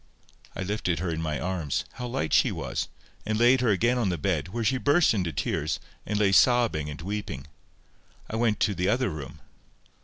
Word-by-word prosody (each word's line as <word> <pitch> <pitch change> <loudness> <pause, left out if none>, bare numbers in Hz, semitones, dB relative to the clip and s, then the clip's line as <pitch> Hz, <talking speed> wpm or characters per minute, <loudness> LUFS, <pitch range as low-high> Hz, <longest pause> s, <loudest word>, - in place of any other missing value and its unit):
I 95 - -3
lifted 95 -3 -1
her 85 +1 -2
in 80 0 -3
my 75 -3 -2
arms—how 90 - -3
light 80 -10 -2
she - - +4
was!—and 110 0 -5
laid 120 +3 +5
her 125 - +2
again 120 +5 +2
on 110 -5 +1
the 90 - -1
bed, 80 0 -1
where 115 +5 -3
she 130 +4 +1
burst 145 +3 +4
into 90 -6 -1
tears, 75 +2 -1 0.3
and 105 - -1
lay 100 -2 +3
sobbing 110 - +4
and 75 - -7
weeping. 95 -7 -5 0.8
I - - -5
went 110 -2 +1
to 105 - +3
the 90 -1 -1
other 120 -1 +1
room. 75 -3 -8
100 Hz, 185 wpm, -27 LUFS, 80-120 Hz, 0.8 s, laid